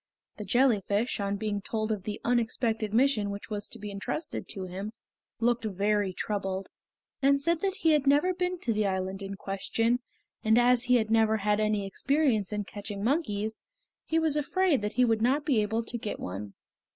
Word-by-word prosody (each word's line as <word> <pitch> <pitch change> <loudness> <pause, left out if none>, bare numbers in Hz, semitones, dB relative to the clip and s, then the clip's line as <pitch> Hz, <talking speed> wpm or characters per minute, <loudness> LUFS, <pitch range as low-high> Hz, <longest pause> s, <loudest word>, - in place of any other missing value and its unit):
The 210 - -6
jellyfish, 220 -1 +2
on 200 0 -1
being 205 0 -2
told 215 +1 -2
of 210 -2 -1
the 210 - -4
unexpected 225 -2 0
mission 230 -3 +3
which 200 +2 -7
was 205 -1 -3
to - - -8
be 210 -1 -6
entrusted 210 +10 -4
to 195 - -4
him, 190 +4 -6 0.5
looked 240 0 +1
very 205 0 +1
troubled, 195 0 -3 0.5
and 280 +1 +4
said 330 +3 +1
that 390 -1 0
he 325 - +4
had 295 -2 +2
never 295 +7 +4
been 360 0 -1
to 235 - 0
the 210 -1 +1
island 190 0 -2
in 195 0 -5
question, 225 +5 0 0.4
and 220 +1 +4
as 245 0 +4
he 250 0 +4
had 220 -2 +1
never 220 -1 +4
had 210 0 +1
any 215 -2 +1
experience 245 -1 +1
in 210 0 -1
catching 205 0 -6
monkeys 220 -6 0 0.4
he 320 - 0
was 320 -2 +2
afraid 300 - +2
that 210 +1 -2
he 250 +2 +4
would 225 -2 +1
not 275 +5 +2
be 260 -8 +3
able 220 +2 -1
to 235 +1 -5
get 215 - -4
one. 100 +2 -6
220 Hz, 190 wpm, -29 LUFS, 205-250 Hz, 0.5 s, and